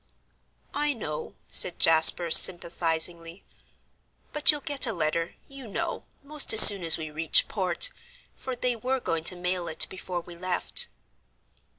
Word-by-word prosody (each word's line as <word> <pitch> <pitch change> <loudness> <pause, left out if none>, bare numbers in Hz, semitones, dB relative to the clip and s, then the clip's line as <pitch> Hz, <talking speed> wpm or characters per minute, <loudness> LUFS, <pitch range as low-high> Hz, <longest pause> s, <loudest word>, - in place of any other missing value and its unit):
"I 295 0 -3
know," 155 - -10
said 180 - 0
Jasper, 165 +1 +4
sympathisingly, 170 0 +2 0.9
"but 300 +2 +1
you'll 295 -1 -6
get 285 -4 -2
a 225 - -5
letter, 165 0 -5
you 275 -3 -13
know, 205 - -7 0.2
most 300 +1 +1
as 220 - +9
soon 200 -3 +8
as 165 -1 +2
we 155 -2 -10
reach 160 +1 +1
port, 205 - -3 0.4
for 260 -1 -7
they 245 0 -4
were 255 +4 -5
going 165 -8 -6
to 180 - +3
mail 180 0 -6
it 160 - +2
before 185 -2 -8
we 175 0 -15
left." 180 +1 -2
180 Hz, 150 wpm, -23 LUFS, 165-250 Hz, 0.9 s, as